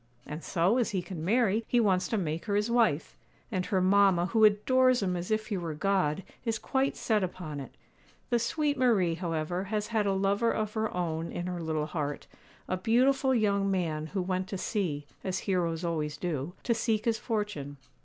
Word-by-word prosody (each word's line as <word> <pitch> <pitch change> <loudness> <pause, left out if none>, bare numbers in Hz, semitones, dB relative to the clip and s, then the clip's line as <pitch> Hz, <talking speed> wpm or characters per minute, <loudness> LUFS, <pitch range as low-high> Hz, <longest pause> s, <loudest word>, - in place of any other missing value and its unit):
And 150 +2 -7
so, 185 +7 +2
as 240 - +1
he 190 -3 -2
can 175 -5 -6
marry, 220 +2 +2
he 245 - +3
wants 190 -5 +2
to 225 - -1
make 165 -4 -2
her 205 -2 0
his 210 +3 +1
wife; 225 -11 +1 0.3
and 185 -3 -1
her 190 - +1
mamma, 190 -1 +4
who 220 +3 +2
adores 250 +3 +4
him 180 -2 0
as 175 0 -4
if 215 0 -1
he 205 - -1
were 165 -3 -4
God, 185 -1 +1 0.2
is 225 -2 -1
quite 265 +4 0
set 215 -3 +1
upon 175 -5 -5
it. 135 - -9 0.6
The 240 - +3
sweet 290 +4 0
Marie, 210 -10 +3
however, 170 +1 -2
has 210 +1 -2
had 220 -3 +1
a 195 - +2
lover 200 +4 +2
of 215 -1 -2
her 220 -1 -1
own 165 -2 -2
in 175 - -4
her 180 -1 -3
little 155 -2 -1
heart, 150 -2 -3 0.4
a 185 - -1
beautiful 260 +6 +3
young 200 -3 +2
man 160 -5 -1
who 190 +3 -2
went 185 0 -2
to 195 - -4
sea, 170 -8 -2 0.2
as 190 -1 -1
heroes 175 -3 0
always 150 -3 -2
do, 160 -1 -3
to 235 - +2
seek 225 -1 0
his 230 -1 +1
fortune. 205 - -3
190 Hz, 200 wpm, -29 LUFS, 170-220 Hz, 0.6 s, mamma